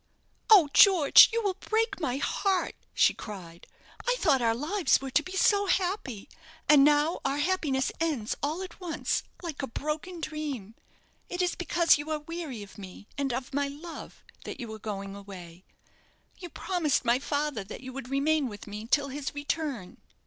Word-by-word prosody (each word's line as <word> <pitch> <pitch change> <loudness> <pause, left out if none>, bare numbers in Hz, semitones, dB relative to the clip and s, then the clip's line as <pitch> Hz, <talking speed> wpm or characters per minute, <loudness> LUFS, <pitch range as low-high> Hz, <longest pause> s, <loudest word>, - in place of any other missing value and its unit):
"Oh, 395 -8 +8
George, 365 -8 +8
you 460 0 -1
will 400 -2 +1
break 445 -1 0
my 260 -6 -1
heart," 380 +6 0 0.2
she - - +4
cried. 175 -5 -10 0.4
"I - - +3
thought 275 - +3
our 225 -1 +2
lives 330 - +1
were 270 -1 -6
to 285 +3 +3
be 370 +5 -9
so 405 +1 +3
happy; 360 - -1 0.4
and 290 -2 +7
now 295 +3 +3
our 275 - 0
happiness 295 -5 0
ends 300 -10 -1
all 310 +6 -2
at 370 - -10
once 345 -3 -1 0.2
like 325 -5 -5
a 270 - -3
broken 305 +7 -4
dream. 290 -10 -5 0.6
It 355 - -5
is 355 - 0
because 340 -3 +3
you 295 +1 -6
are 310 - 0
weary 300 -7 -6
of 200 - -14
me, 190 +1 -10
and 280 -2 -1
of 255 +2 -4
my 285 0 0
love, 310 +4 -9 0.2
that - - -7
you 230 -3 -6
are 220 - -9
going 200 -2 -5
away. 185 -3 -11 0.7
You 355 - -8
promised 335 -7 -1
my 240 +1 +3
father 285 -5 -2
that 200 - -9
you 260 -1 -8
would 265 -2 -7
remain 280 0 +1
with 205 -2 -10
me 210 +1 -7
till 280 +3 +2
his 280 +1 -5
return." 285 - -4
290 Hz, 180 wpm, -28 LUFS, 240-335 Hz, 0.7 s, Oh